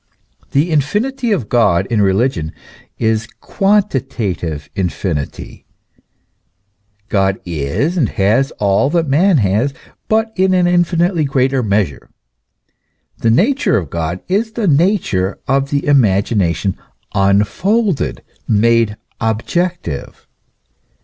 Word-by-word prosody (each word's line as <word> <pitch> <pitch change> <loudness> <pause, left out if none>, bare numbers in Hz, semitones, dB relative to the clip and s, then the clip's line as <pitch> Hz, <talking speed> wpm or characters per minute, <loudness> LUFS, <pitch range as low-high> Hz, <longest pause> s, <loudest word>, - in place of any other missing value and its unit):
The 150 +5 +1
infinity 220 - 0
of 140 - 0
God 95 -7 +2
in 110 -3 +2
religion 95 -5 0 0.4
is 110 0 0
quantitative 125 - -1
infinity; 90 -5 -4 1.4
God 95 -2 +1
is 85 - -2
and 135 -10 +2
has 115 +7 +1
all 100 +6 +2
that 165 0 0
man 165 +6 +3
has, 110 +5 +1 0.3
but 220 0 +1
in 185 0 +2
an 180 -1 +3
infinitely 175 -1 +2
greater 135 -1 +1
measure. 100 - -1 1.1
The 115 - +1
nature 235 - +2
of 85 -9 -4
God 85 +2 -3
is 220 +4 0
the 225 -4 -1
nature 150 - +1
of 135 0 +1
the 145 0 -1
imagination 100 - +1 0.4
unfolded, 105 - +1 0.2
made 115 0 +2 0.2
objective. 115 - -2
125 Hz, 105 wpm, -16 LUFS, -, 1.4 s, man